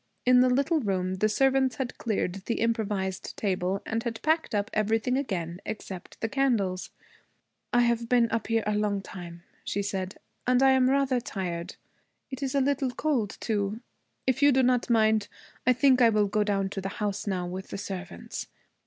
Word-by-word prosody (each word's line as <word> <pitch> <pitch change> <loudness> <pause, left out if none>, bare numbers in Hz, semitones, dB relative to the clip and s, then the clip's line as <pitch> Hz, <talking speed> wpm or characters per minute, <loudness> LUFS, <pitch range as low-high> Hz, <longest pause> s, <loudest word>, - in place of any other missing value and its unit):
In 250 0 +6
the 255 0 +5
little 280 +6 +2
room 190 -5 -1
the 215 +3 +2
servants 265 +2 +2
had 255 -2 -4
cleared 210 -5 -1
the 230 - 0
improvised 210 -5 -1
table 190 -1 -1
and 225 0 -1
had 230 -1 -4
packed 315 -6 +1
up 205 +1 -1
everything 220 +4 +1
again 185 -9 -3
except 190 -4 -7
the 225 - +1
candles. 225 -9 0 0.8
'I 245 - +4
have 235 -1 +1
been 245 -2 +4
up 225 -1 -1
here 225 -1 +1
a 210 - +1
long 205 -1 0
time,' 170 -3 -9 0.2
she 200 - -2
said, 195 -1 -3 0.3
'and 250 +1 +4
I 270 - +7
am 260 -1 +4
rather 270 -2 +2
tired. 180 -6 -4 0.6
It 265 +1 -6
is 275 0 -2
a 275 - +4
little 275 0 +1
cold, 245 -5 -1
too. 210 -1 -1 0.5
If 260 0 +1
you 285 0 +7
do 265 0 +3
not 250 -1 +2
mind, 220 -2 +3 0.4
I 255 - +7
think 260 0 +4
I 235 - +7
will 210 -2 +3
go 210 +1 +1
down 195 -2 0
to 195 - -4
the 195 - -3
house 205 -1 -2
now, 185 -3 -1
with 185 +2 -6
the - - -6
servants. 190 - -6
220 Hz, 190 wpm, -28 LUFS, 195-255 Hz, 0.8 s, I